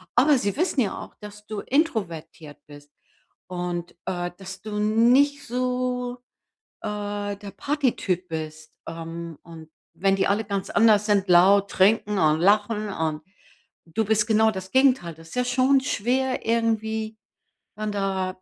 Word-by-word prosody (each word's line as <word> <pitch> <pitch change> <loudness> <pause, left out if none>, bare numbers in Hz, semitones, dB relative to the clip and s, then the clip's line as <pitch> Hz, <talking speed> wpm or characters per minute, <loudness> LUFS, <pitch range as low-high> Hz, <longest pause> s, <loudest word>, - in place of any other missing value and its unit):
Aber 275 +3 +5
sie 200 -3 -1
wissen 325 -4 +1
ja 210 - -1
auch, - - -10
dass 210 0 -11
du 215 -1 -5
introvertiert 170 - -2
bist 145 0 -14 0.6
und, 175 -1 -4
äh, 175 -1 -3
dass 190 0 -9
du 210 0 -4
nicht 250 +7 +3
so, 250 -1 -2 0.6
äh, 205 -1 -4
der 200 0 -9
Partytyp 230 - -1
bist, 155 -1 -6
ähm, 165 0 -7
und 160 -2 -12 0.2
wenn 195 +4 +2
die 195 - +1
alle 205 +2 +1
ganz 200 -2 -3
anders 215 -2 +4
sind, 205 -2 +2
laut, 195 +3 +5
trinken 205 +1 +3
und 155 -1 +3
lachen 210 +2 +2
und 160 -4 -2 0.6
du 170 +7 -1
bist 210 0 +2
genau 220 0 +4
das 190 -2 -7
Gegenteil. 260 -10 +3
Das 165 +4 -13
ja 250 0 +1
schon 260 +2 +3
schwer 260 +2 -1
irgendwie, 220 -1 -1 0.6
dann 215 0 -3
da 190 -2 -2
205 Hz, 145 wpm, -24 LUFS, 180-230 Hz, 0.6 s, Aber